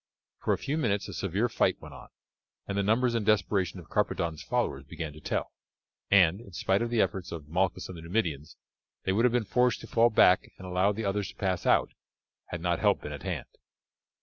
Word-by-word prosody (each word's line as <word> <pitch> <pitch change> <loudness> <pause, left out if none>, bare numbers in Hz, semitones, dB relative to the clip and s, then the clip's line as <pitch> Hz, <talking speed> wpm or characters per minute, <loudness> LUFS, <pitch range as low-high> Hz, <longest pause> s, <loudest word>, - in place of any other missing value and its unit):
For - - -1
a - - +2
few 150 +3 -2
minutes 105 -7 0
a - - -7
severe 100 +5 0
fight - - +1
went - - -11
on, - - -12 0.6
and 100 - -3
the 100 - +2
numbers 115 +4 +2
and 115 -2 0
desperation 100 -3 +1
of 85 - -13
Carpadon's 80 -2 -1
followers 115 - -1
began 75 +2 -6
to 75 - -12
tell, - - -2 0.6
and, 95 0 +5
in 100 -6 -14
spite 95 +4 +1
of 120 - -1
the 120 -1 0
efforts 95 -3 0
of 80 -4 -7
Malchus 90 +3 0
and 95 - -8
the 80 - -9
Numidians, 80 -5 -2 0.5
they - - 0
would 115 +5 +3
have 125 - +4
been 120 -2 +1
forced 125 +2 +2
to - - -9
fall 115 +1 +4
back 90 -4 +4
and 95 - -10
allow 90 +2 +2
the 110 +1 -4
others 100 0 -1
to - - -12
pass 95 -3 -1
out, - - +3 0.6
had 85 - -5
not 85 0 0
help - - +2
been 75 - -6
at 70 - -7
hand. - - -3
95 Hz, 220 wpm, -29 LUFS, 85-110 Hz, 0.6 s, and